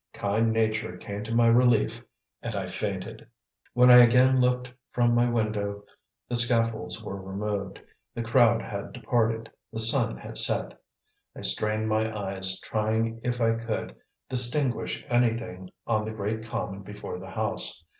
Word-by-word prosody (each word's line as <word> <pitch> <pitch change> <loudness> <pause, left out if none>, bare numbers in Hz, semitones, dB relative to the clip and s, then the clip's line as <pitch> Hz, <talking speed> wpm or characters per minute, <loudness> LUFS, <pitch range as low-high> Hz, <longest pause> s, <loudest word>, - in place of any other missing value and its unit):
Kind 110 +3 0
nature 110 -4 -1
came 100 +1 -6
to 110 - -6
my 120 0 +4
relief, 115 -1 +3 0.4
and 115 -2 -5
I 100 -2 -2
fainted. 95 +2 -5 0.5
When 125 0 +6
I 125 - +10
again 125 +2 +6
looked 125 0 0 0.2
from 120 -1 +2
my 120 +1 +3
window 105 -3 -2 0.4
the - - -6
scaffolds 115 -4 +1
were 100 0 -6
removed, 100 0 -4 0.4
the 115 - -3
crowd 115 -1 +3
had 100 -2 -6
departed, 115 -1 -1 0.2
the 110 - -7
sun 110 - +3
had - - -7
set. - - +1 0.6
I - - -9
strained 110 - +2
my 110 0 0
eyes, 95 -1 -1
trying 110 +1 -1
if 125 0 -2
I 115 -1 +3
could 115 -1 -4 0.3
distinguish 125 +1 +1
anything 115 -6 -1 0.2
on 110 -2 0
the 110 - -5
great 110 +1 -4
common 100 -3 -4
before 105 -2 -8
the - - -10
house. 85 - -1
110 Hz, 150 wpm, -27 LUFS, 100-120 Hz, 0.6 s, I